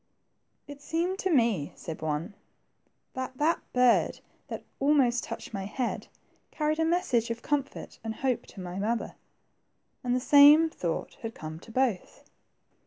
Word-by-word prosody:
^^It 285 0 -10
seemed 340 +6 -1
to 380 - 0
me," 230 - +2
said 160 -2 -7
one, 155 +5 -2 0.8
that 260 0 -5
that 315 +4 +2
bird 250 -1 +3 0.3
that - - -6 0.2
almost 270 -4 +3
touched 230 0 -7
my 195 -2 -3
head, 240 +5 -3 0.4
carried 305 0 -1
a 320 - +3
message 270 -9 +1
of 230 +1 -4
com 290 -1 +2
fort 275 - -11
and 220 -1 -4
hope 260 -1 -1
to - - -12
my 180 0 -5
mother." 225 +3 -1 0.9
And 245 0 +1
the - - +2
same 295 +4 +7
thought 170 - -4
had 225 -1 -6
come 155 0 -7
to 225 - -14
both. 240 -6 -1
250 Hz, 155 wpm, -28 LUFS, 220-290 Hz, 0.9 s, same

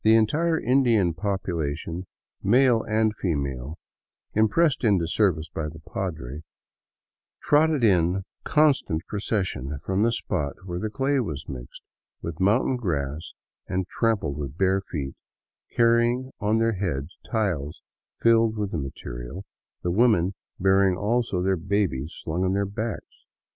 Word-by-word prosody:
The 110 +1 +6
entire 160 +10 +2
Indian 115 -8 +3
popula 85 -5 -2
tion, 85 +3 -6 0.3
male 120 +2 +4
and 110 0 +1
female, 70 -4 -2 0.6
impressed 130 +8 +3
into 100 -7 +3
service 85 -4 +1
by 75 0 -4
the 80 - -11
padre, 80 -4 -5 1.0
trotted 150 -2 +3
in 95 -2 +3 0.2
constant 140 - +2
procession 95 - -2
from 95 +1 0
the 115 +2 +3
spot 70 -10 -2
where 90 -1 -4
the 110 - -2
clay 135 +4 +1
was 80 - -4
mixed 60 -4 -8 0.4
with 85 0 -6
mountain 110 +7 +3
grass 75 - -3 0.3
and 95 0 -1
trampled 110 - 0
with 70 +1 -5
bare 95 +1 +2
feet, 70 -7 -5 0.6
carrying 120 +2 +3
on 110 +2 +2
their 115 0 +2
heads 85 -6 -3
tiles 85 - -2 0.4
filled 115 -1 +4
with 105 -2 -2
the 85 - -2
material, 65 +5 -7 0.4
the 90 - 0
women 100 -3 +3 0.3
bearing 95 0 +4
also 105 -3 0
their 95 0 +2
babies 85 -6 -1
slung 85 +3 -1
on 95 0 +1
their 100 +1 +1
backs. 105 +3 -6
95 Hz, 135 wpm, -25 LUFS, 80-115 Hz, 1.0 s, The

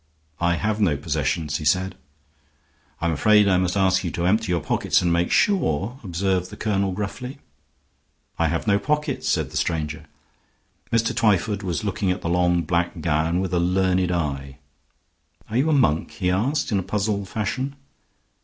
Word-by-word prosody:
"I 85 0 +2
have 105 +3 -1
no 85 -8 +2
possessions," 75 +1 -1
he 80 - -7
said. 90 +5 +1 1.1
"I'm 85 0 +1
afraid 105 +5 +4
I 95 -2 +4
must 90 +1 0
ask 95 -1 +3
you 90 - -1
to 85 - -1
empty 105 +1 +2
your 85 - +2
pockets - - +1
and 85 -1 +2
make 85 +1 +1
sure," 120 - +1
observed 95 0 -1
the - - -10
colonel, 100 -3 0
gruffly. 115 +8 -5 1.0
"I 85 - +3
have 80 +1 -2
no 100 -2 +3
pockets," 150 +4 -1
said - - 0
the - - -3
stranger. 75 -2 -2 0.9
Mr. 115 0 +1
Twyford 105 -2 +2
was 90 -3 -3
looking 100 -1 -1
at 90 - -1
the 85 - -2
long 90 0 +2
black 85 +2 -1
gown 80 +2 +1
with 95 -1 -3
a 90 - +2
learned 90 0 +1
eye. 70 -5 -3 0.9
"Are 115 - 0
you 140 +5 +2
a - - +3
monk?" 120 - +2
he 90 -2 -1
asked, 120 +12 0
in 100 - +2
a - - -1
puzzled 100 0 -2
fashion. 130 +6 -2
90 Hz, 175 wpm, -23 LUFS, 85-105 Hz, 1.1 s, afraid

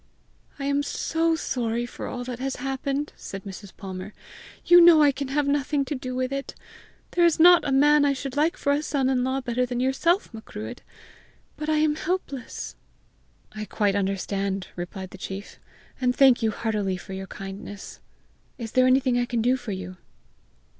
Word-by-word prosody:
"I 275 - -4
am 280 0 +1
so 325 +3 0
sorry 240 -6 -2
for 240 - -7
all 245 -1 -5
that 245 -1 -6
has 270 +1 -2
happened!" 270 +2 -3
said 195 0 -8
Mrs. 195 0 -9
Palmer. 190 +1 -7 0.5
"You 350 0 +8
know 335 -3 +8
I 290 - +6
can 275 0 -4
have 290 +2 0
had 280 - +2
nothing 285 0 0
to 270 - -3
do 255 -2 -5
with 255 +1 -1
it! 275 0 -4 0.6
There 350 - +2
is 340 -2 +4
not 350 +1 +8
a - - 0
man 295 +2 +5
I 285 -1 +3
should 275 -1 -5
like 310 +3 +2
for 285 - 0
a 285 +1 +2
son 275 -4 0
in 250 -1 +1
law 260 +1 -1
better 250 0 -1
than 245 -1 -2
yourself, 270 - +1
Macruadh; 220 +1 -8 0.8
but 305 0 -4
I 310 - +3
am 305 0 +3
helpless." 315 -8 -4 0.8
"I 215 0 -6
quite 205 0 0
understand," 195 0 -2
replied 185 +2 -6
the 190 - -11
chief, 195 +1 -7 0.4
"and 250 -1 +2
thank 265 -3 +6
you 225 - +2
heartily 210 -3 -1
for 190 - -9
your 190 0 -6
kindness. 195 +1 -8 0.6
Is 225 -3 -6
there 255 0 +4
anything 255 -1 +3
I 245 - +1
can 235 -2 -1
do 250 +2 +3
for 245 -4 -6
you?" 185 -1 -6
255 Hz, 190 wpm, -25 LUFS, 210-285 Hz, 0.8 s, You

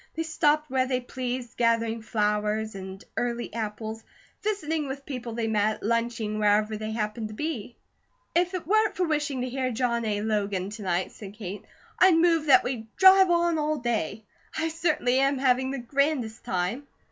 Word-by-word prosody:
They 325 - -1
stopped 305 -1 +2
where 260 -1 +2
they 255 -1 0
pleased, 250 -1 -5
gathering 230 -1 +1
flowers 210 0 0
and 190 0 -8
early 240 -2 -2
apples, 220 0 -4 0.4
visiting 325 -8 -1
with 275 +1 -6
people 250 -4 -5
they 230 0 -2
met, 215 -1 0
lunching 230 -1 -1
wherever 210 +1 +3
they 215 0 -4
happened 215 0 -2
to 215 - -9
be. 255 -6 -4 0.6
"If 355 +2 +2
it 360 - -4
weren't 425 +2 +2
for 365 - +2
wishing 295 -4 -1
to 255 - -2
hear 260 0 -1
John 235 -1 0
A. 205 -1 -1
Logan 205 -3 -1
to 215 +1 -8
night," 180 -2 -1
said 205 -1 -10
Kate, 205 -2 -7 0.3
"I'd 370 -2 +7
move 330 -2 +3
that 275 - +7
we 245 -3 -4
drive 380 0 +8
on 340 -2 +2
all 305 0 0
day. 220 - -2 0.3
I 325 +1 0
certainly 310 -6 +1
am 275 +1 +2
having 260 0 +2
the 275 - -3
grandest 265 -2 -1
time." 185 +11 -2
240 Hz, 175 wpm, -27 LUFS, 215-300 Hz, 0.6 s, drive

